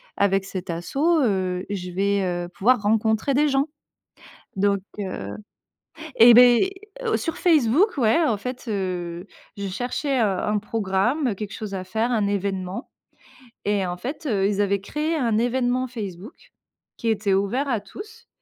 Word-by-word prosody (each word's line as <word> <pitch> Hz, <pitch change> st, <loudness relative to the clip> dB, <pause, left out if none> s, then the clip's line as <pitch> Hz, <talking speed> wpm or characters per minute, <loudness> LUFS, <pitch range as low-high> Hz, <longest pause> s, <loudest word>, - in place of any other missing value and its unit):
avec 195 Hz, -1 st, +2 dB
cette 190 Hz, -1 st, -6 dB
asso, 170 Hz, +8 st, -5 dB, 0.3 s
heu, 185 Hz, -5 st, 0 dB
je 180 Hz, -3 st, -4 dB
vais, 200 Hz, +2 st, +1 dB
heu, 175 Hz, -1 st, -2 dB
pouvoir 225 Hz, +5 st, +2 dB
rencontrer 220 Hz, +4 st, +1 dB
des 295 Hz, +3 st, +3 dB
gens.» 275 Hz, +1 st, +2 dB, 0.9 s
donc, 200 Hz, 0 st, +1 dB, 0.2 s
heu 185 Hz, -, -5 dB, 0.8 s
et, 235 Hz, +1 st, +9 dB
beh 245 Hz, +9 st, +6 dB, 0.5 s
sur 330 Hz, -, -3 dB
Facebook 320 Hz, -, +3 dB
ouais. 235 Hz, +4 st, +3 dB
En 230 Hz, -8 st, +1 dB
fait, 250 Hz, +4 st, -6 dB
heu, 180 Hz, -3 st, -3 dB, 0.3 s
je 200 Hz, -1 st, -4 dB
cherchais, 250 Hz, +7 st, -2 dB
heu, -, -, +4 dB
un 210 Hz, +1 st, 0 dB
programme, 220 Hz, +5 st, 0 dB
quelque 210 Hz, +1 st, -6 dB
chose 215 Hz, -2 st, -6 dB
à 185 Hz, -, -3 dB
faire, 220 Hz, +6 st, -1 dB
un 215 Hz, -4 st, +1 dB
événement. 195 Hz, +1 st, -3 dB, 0.7 s
Et 205 Hz, -2 st, 0 dB
en 175 Hz, -1 st, -3 dB
fait, 270 Hz, -, -6 dB
heu, 200 Hz, -6 st, +1 dB
ils 205 Hz, 0 st, -1 dB
avaient 200 Hz, -1 st, +1 dB
créé 300 Hz, +10 st, -2 dB
un 235 Hz, -8 st, +1 dB
événement 245 Hz, +2 st, +1 dB
Facebook, 210 Hz, -, -8 dB, 0.5 s
qui 230 Hz, -, -1 dB
était 205 Hz, -2 st, +1 dB
ouvert 200 Hz, +9 st, 0 dB
à 235 Hz, -4 st, +1 dB
tous. 435 Hz, -, -12 dB
210 Hz, 155 wpm, -23 LUFS, 195-250 Hz, 0.9 s, et